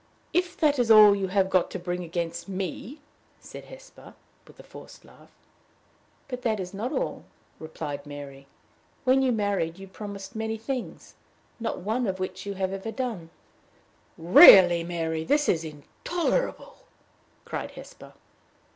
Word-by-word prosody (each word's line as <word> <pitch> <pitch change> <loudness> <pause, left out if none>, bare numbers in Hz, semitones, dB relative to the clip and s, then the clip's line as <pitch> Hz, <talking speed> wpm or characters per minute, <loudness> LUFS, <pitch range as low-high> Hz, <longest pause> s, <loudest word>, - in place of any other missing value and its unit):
"If 360 0 0
that 295 -4 +2
is 240 -2 +1
all 215 -2 +8
you 195 -1 -2
have 190 0 +1
got 185 -2 +1
to - - -5
bring 180 0 -4
against 170 +1 -5
me! 195 - -6 0.2
" - - -37
said - - -11
Hesper, - - -15 0.3
with - - -19
a - - -12
forced - - -14
laugh. - - -19 1.0
"But 250 -2 -6
that 220 -4 -1
is 185 0 -6
not 220 +7 -4
all," - - -3 0.4
replied 145 -2 -7
Mary. 140 -1 -10 0.6
"When 260 +1 +3
you 260 -1 +2
married, 200 -6 -1
you 195 0 -11
promised 200 0 -9
many 220 0 -3
things, 245 +3 -6 0.5
not 225 -5 -4
one 225 +5 -1
of 190 -1 -3
which 185 +1 -5
you 200 - -4
have 190 0 -2
ever 195 +3 -5
done." 225 -10 -5 0.9
"Really, 175 0 +8
Mary, 165 -2 -3
this 290 - +1
is 165 -2 +1
intolerable!" 320 - -3 0.7
cried - - -5
Hesper. - - -13
195 Hz, 150 wpm, -26 LUFS, 170-235 Hz, 1.0 s, all